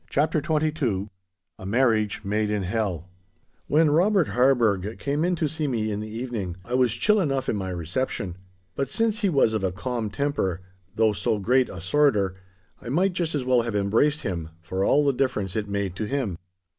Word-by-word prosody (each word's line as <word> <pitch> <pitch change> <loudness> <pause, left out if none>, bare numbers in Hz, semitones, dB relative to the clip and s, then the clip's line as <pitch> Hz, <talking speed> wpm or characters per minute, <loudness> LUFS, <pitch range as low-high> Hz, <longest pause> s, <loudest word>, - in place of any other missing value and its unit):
*CHAPTER 155 +2 +1
XXII* 150 - 0 0.5
*A - - -9
MARRIAGE 110 -2 +1
MADE 105 +1 0
IN 105 -2 -1
HELL* 95 -4 -2 0.6
When 155 0 +4
Robert 180 +2 +3
Harburgh 115 -6 +2
came 145 +2 -1
in 180 +1 +1
to 160 -2 0
see 155 0 -2
me 110 -5 -1
in 105 - -2
the 110 0 -6
evening, 110 -6 -4
I 120 - -6
was 125 -3 +3
chill 210 - +3
enough 135 -7 0
in - - 0
my 95 -2 -3
reception; 90 +2 -3 0.4
but 135 +5 -2
since 225 -1 0
he 205 -4 +2
was 135 -8 +3
of 110 -3 -1
a 95 - +1
calm 115 +3 -3
temper, 100 - -1 0.3
though 110 -1 +3
so 105 - 0
great 125 +6 +2
a 90 - -7
sworder, 100 - +2 0.5
I 120 - -7
might 180 +8 +2
just 170 -3 -1
as 135 -3 -2
well 125 -1 +4
have 115 -2 -3
embraced 115 +10 +2
him, 85 -4 -3
for 95 +3 -2
all 145 +8 +3
the 140 - +3
difference 120 -8 -1
it 105 -2 -2
made 100 -2 -2
to 110 - -2
him. 105 -8 -2
115 Hz, 195 wpm, -25 LUFS, 100-145 Hz, 0.6 s, When